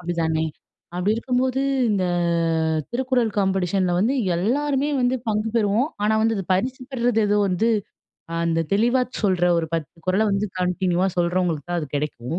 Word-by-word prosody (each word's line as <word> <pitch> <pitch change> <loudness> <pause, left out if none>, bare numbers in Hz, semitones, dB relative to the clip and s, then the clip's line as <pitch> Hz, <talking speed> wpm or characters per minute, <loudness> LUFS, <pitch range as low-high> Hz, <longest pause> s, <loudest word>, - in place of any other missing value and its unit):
அப்டித்தானே? 165 -2 -1 0.5
அப்டி 185 +4 0
இருக்கும்போது 255 +2 0 0.3
இந்த 195 -3 +1 0.9
திருக்குறள் 250 -1 +1
காம்பெடிஷன்ல 190 -1 +1
வந்து 235 +8 +2 0.2
எல்லாருமே 275 +9 0
வந்து 250 +1 +2
பங்கு 215 +1 0
பெறுவோம். 220 +5 +2
ஆனா, 215 +1 +2
வந்து 220 -5 0
பரிசு 250 +8 -1
பெற்றது 240 -3 +1
ஏதோ 205 0 +2
வந்து, 210 +6 +1 0.8
அந்த 165 0 +1
தெளிவாச் 240 +5 +1
சொல்ற 185 -3 +2
ஒரு 165 - -1
10 165 -1 -4
குறள 185 +3 +2
வந்து 195 +1 0
கண்டினியூவா 180 0 +1
சொல்றவங்களுக்கு 175 -3 0
தான் 175 - 0
அது 150 - -4
கெடைக்கும். 145 0 -3
200 Hz, 140 wpm, -23 LUFS, 175-240 Hz, 0.9 s, வந்து